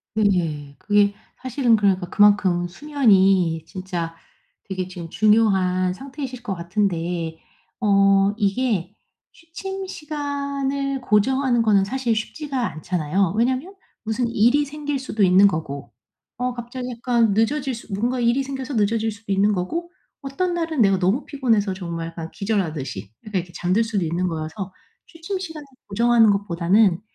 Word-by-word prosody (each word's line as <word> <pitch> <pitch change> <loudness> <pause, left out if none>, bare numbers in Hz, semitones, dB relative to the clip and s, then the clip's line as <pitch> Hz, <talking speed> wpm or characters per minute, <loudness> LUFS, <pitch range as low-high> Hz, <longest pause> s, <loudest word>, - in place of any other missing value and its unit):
네네. 165 -9 0
그게 205 -1 +2 0.3
사실은 255 -2 +2
그러니까 195 -4 +1
그만큼 195 -4 +4
수면이 190 - +2
진짜 175 -3 -5 0.5
되게 185 -1 -3
지금 175 -3 -8
중요한 190 -3 +3
상태이실 260 0 -7
것 205 - -2
같은데 170 -2 -2 0.4
어 195 -2 +4
이게 205 -3 0 0.4
취침 385 +3 -7
시간을 280 -3 -3
고정하는 245 +2 +2
거는 205 -3 +4
사실 240 +2 -1
쉽지가 275 +5 -4
않잖아요. 170 +3 -1
왜냐하면 255 - 0 0.3
무슨 225 +2 -1
일이 240 +6 +3
생길 290 -1 -4
수도 220 -5 -1
있는 190 +2 +6
거고. 140 -8 -4 0.5
어 250 0 -1
갑자기 245 +1 -6
약간 235 -2 +1
늦어질 265 +6 +1
수 225 -2 -10
뭔가 240 +5 -1
일이 240 +3 +2
생겨서 265 0 -5
늦어질 220 +1 +1
수도 210 -1 -8
있는 200 +2 +3
거고. 330 - -3 0.3
어떤 320 +7 -2
날은 330 -6 -1
내가 195 -2 +4
너무 195 +10 +1
피곤해서 225 -9 +1
정말 170 -3 -5
약간 165 -1 -7
기절하듯이 160 - -3
약간 210 -3 -1
이렇게 175 0 -14
잠들 185 +7 +1
수도 210 -5 -1
있는 170 +3 -1
거여서 160 +4 -5 0.3
취침 335 +4 -6
시간을 320 -5 -7 0.2
고정하는 230 +2 +4
것보다는 195 0 +2
210 Hz, 325 characters per minute, -22 LUFS, 185-260 Hz, 0.5 s, 있는